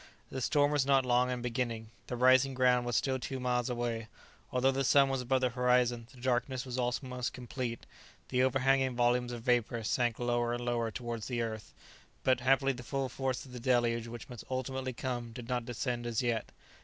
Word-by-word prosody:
The 130 - -4
storm 145 +1 +3
was 145 -2 +3
not 135 -1 +3
long 125 0 +3
in 125 -1 -3
beginning. 115 -2 -2 0.2
The 125 - -3
rising 130 +2 +5
ground 125 -1 +3
was 120 - -1
still 130 +1 +1
two 130 +1 -4
miles 125 -1 0
away. 120 -2 -2 0.4
Although 130 +1 +3
the 135 +1 0
sun 140 +1 +5
was 135 -1 -1
above 130 +1 +1
the 130 - +2
horizon, 125 -1 +2
the 130 - -16
darkness 125 +1 0
was 125 -2 -5
almost 125 0 -2
complete; 125 -2 -5 0.4
the 125 -1 +2
overhanging 130 0 +2
volumes 120 0 +2
of 120 -2 -6
vapour 120 -2 +1
sank 120 +1 +1
lower 120 -1 0
and 120 0 -5
lower 120 -2 0
towards 115 -1 -5
the 120 -2 -1
earth, 110 -2 -6 0.5
but 130 -1 +3
happily 135 +2 +3
the 125 - -8
full 135 +1 -2
force 130 -1 -2
of 130 - -13
the 125 - -6
deluge 120 -2 +1
which 115 0 -8
must 120 -2 -9
ultimately 130 0 -2
come 120 -1 -4
did 120 -1 -8
not 125 -2 -1
descend 120 0 -2
as 115 +1 -1
yet. 115 -2 -1
125 Hz, 200 wpm, -32 LUFS, 120-130 Hz, 0.5 s, rising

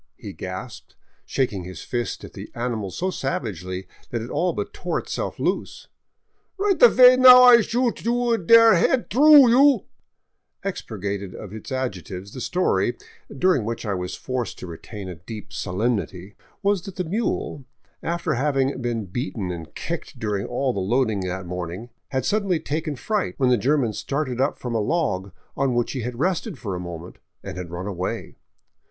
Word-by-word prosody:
he - - -8
gasped, - - -8 0.3
shaking 105 -8 -1
his 90 -2 -8
fist 120 -1 -3
at - - -10
the - - -9
ani 120 0 -2
mal 105 -3 -4
so 185 - -2
savagely 95 - -4 0.2
that 120 - -2
it 115 +2 -7
all 180 +1 +1
but - - -5
tore - - -2
itself - - -4
loose, - - -3 0.7
Rhight 395 +1 +1
avay 255 - +8
now 250 -1 +10
I 245 -1 +9
shoot 240 +2 -1
you 240 0 +1
der 230 +5 +7
head 235 +8 +2
through, 280 +1 +8
you 275 +3 +5 0.3
" - - -49
Expurgated 100 - -4
of 105 -2 -9
its 110 +4 -9
adjectives, 100 -6 -4
the 130 - -7
story, 120 - 0 0.3
during 140 -2 +2
which 115 +2 -4
I 105 - -1
was 90 -1 -4
forced 130 -2 -4
to - - -8
retain 95 +4 -8
a 90 - -5
deep 105 +5 -10
solemnity, 100 -1 -2 0.3
was 200 -2 +2
that 195 - -8
the 180 - -2
mule, 175 - -2 0.2
— - - -40
after 170 -1 -1
having 135 0 0
been 120 -3 -2
beaten 100 - -4
and 80 -3 -8
kicked - - -5
during 105 -3 -2
all 130 +1 -1
the 100 - -3
loading 110 +2 +1
that 95 +1 -4
morning 90 +6 -6
— - - -52
had 130 -2 -1
suddenly 200 -3 +1
taken 155 0 -3
fright 210 - -2
when 130 -3 +3
the - - +6
German 125 0 +1
started 130 0 -2
up 140 - +1
from 125 -2 -5
a 110 - +1
log 105 - -1 0.2
on 135 -3 0
which 120 -1 0
he 130 - -3
had 120 +1 -5
rested 180 - -1
for 100 -6 -5
a 90 - -3
moment, 85 0 -8 0.2
and - - -6
had 90 -2 -6
run 85 +2 -5
away. 95 -2 -4
125 Hz, 180 wpm, -23 LUFS, -, 0.7 s, now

